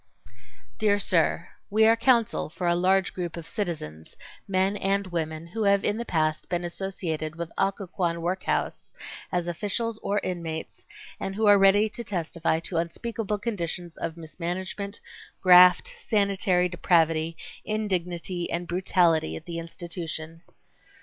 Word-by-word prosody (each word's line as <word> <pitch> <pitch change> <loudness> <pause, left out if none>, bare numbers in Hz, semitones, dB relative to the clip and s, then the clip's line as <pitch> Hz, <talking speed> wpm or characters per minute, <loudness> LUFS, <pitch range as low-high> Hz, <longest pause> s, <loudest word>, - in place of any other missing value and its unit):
Dear 205 -1 +3
Sir:—We 195 +3 +1
are 225 +1 +6
counsel 230 -5 +2
for 175 +3 -5
a 170 - +4
large 185 +2 +2
group 175 -2 -4
of 165 -1 -8
citizens, 155 - -5 0.3
men 190 +1 +1
and 200 0 0
women, 160 -3 -3
who 190 +7 -5
have 200 0 +4
in 210 - +1
the 235 - -4
past 155 -4 0
been 175 -1 -1
associated 170 -4 -4
with 170 -1 -5
Occoquan 185 -3 -1
work 180 +2 -1
house - - -2 0.4
as 175 -1 0
officials 210 +5 -2
or 205 - -1
inmates 165 -3 -5 0.3
and 195 - -4
who 220 +1 +1
are 205 -1 +7
ready 195 +2 +5
to 235 +3 -7
testify 170 -5 -1
to 170 0 -3
unspeakable 210 +5 -2
conditions 175 -5 -3
of 165 0 -5
mismanagement, 180 +5 -5 0.4
graft, 180 - +7
sanitary 200 - +2
depravity, 165 -2 +2 0.3
indignity 180 -4 -2
and 175 +1 -2
brutality 175 - +2
at 80 - -9
the 170 -1 -5
institution. 165 -1 -6
180 Hz, 135 wpm, -26 LUFS, 165-200 Hz, 0.4 s, are